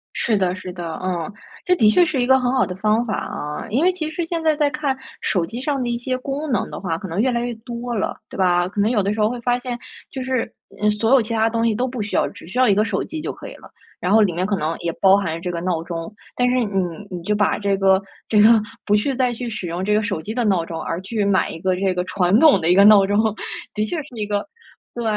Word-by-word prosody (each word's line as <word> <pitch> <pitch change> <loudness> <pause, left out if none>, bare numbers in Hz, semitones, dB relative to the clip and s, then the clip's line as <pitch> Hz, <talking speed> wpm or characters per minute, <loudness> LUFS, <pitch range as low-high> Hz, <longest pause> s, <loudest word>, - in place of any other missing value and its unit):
是 220 -3 +1
的 185 -1 0
是 185 -1 -7
的， 175 -1 -6 0.2
嗯。 180 0 -2 0.3
这 360 - +4
的 215 -11 +5
确 350 +11 +5
是 290 -6 -1
一 - - +2
个 265 +1 +5
很 250 -1 0
好 260 - +3
的 180 - -5
方 215 +4 +1
法 220 - -2
啊， 150 +6 -5
因 265 +8 +2
为 365 - +5
其 320 -4 -4
实 330 +2 -3
现 330 0 -3
在 315 -1 +2
再 295 -1 +2
看 270 0 -2 0.2
手 180 -5 0
机 230 +8 -6
上 275 -1 -1
的 240 - -2
一 240 - -1
些 255 +1 -2
功 280 +4 -4
能 245 - 0
的 - - -6
话， 165 -4 -2
可 190 -2 -7
能 185 +6 -1
越 260 - +2
来 240 -1 0
越 240 0 -3
多 240 0 -5
了， 210 - -1
对 - - -9
吧？ 175 -1 +2
可 205 - -6
能 210 +2 +3
有 210 -5 +1
的 200 +2 0
时 220 - -5
候 210 0 +3
会 245 - -4
发 245 +1 +1
现， 245 -1 -4 0.3
就 265 - -5
是， 255 -2 -1 0.3
嗯 210 - +3
所 215 +2 0
有 270 -2 +6
其 225 +1 -4
他 225 0 +2
东 230 0 0
西 220 - +1
都 245 +4 0
不 250 -3 -4
需 205 - -4
要， - - +3
只 195 - -13
需 210 +8 -7
要 255 -2 +4
一 - - +5
个 210 +2 +2
手 200 -3 -1
机 320 - -6
就 310 - -4
可 - - -10
以 - - -10
了。 - - -15 0.3
然 185 +3 0
后 220 - +6
里 200 - +3
面 175 +2 -1
可 205 - 0
能 160 -2 -2
也 170 -1 -2
包 195 0 +6
含 165 -4 -3
这 180 0 -3
个 170 - -3
闹 170 -2 -1
钟， 170 +3 -6 0.2
但 245 0 +3
是 250 - +1
你 210 -4 -2 0.4
你 175 -2 -5
就 210 +3 0
把 205 -1 +2
这 200 -1 +1
个 190 0 +3 0.3
这 210 -2 +4
个 215 - +8 0.4
不 210 - +3
去 265 +6 +1
再 250 -1 +1
去 240 +1 -5
使 215 -5 -5
用 175 +2 -3
这 210 - +1
个 215 - +3
手 195 -6 -2
机 215 +6 -5
的 240 -2 0
闹 180 -5 +2
钟， 165 -1 -6
而 170 +2 -3
去 210 +1 -2
买 195 -3 +2
一 165 - -7
个 185 +1 0
这 190 0 0
个 180 - -1
传 185 +3 +2
统 315 -3 +6
的 165 - +1
一 180 - +5
个 200 +1 +7
闹 205 -2 +8
钟， 205 +1 +1 0.5
的 210 - -1
确 340 - -3
是 265 -4 -14
一 215 - -2
个 205 +5 -2 0.5
对， 240 - -3
210 Hz, 315 characters per minute, -21 LUFS, 185-245 Hz, 0.5 s, 个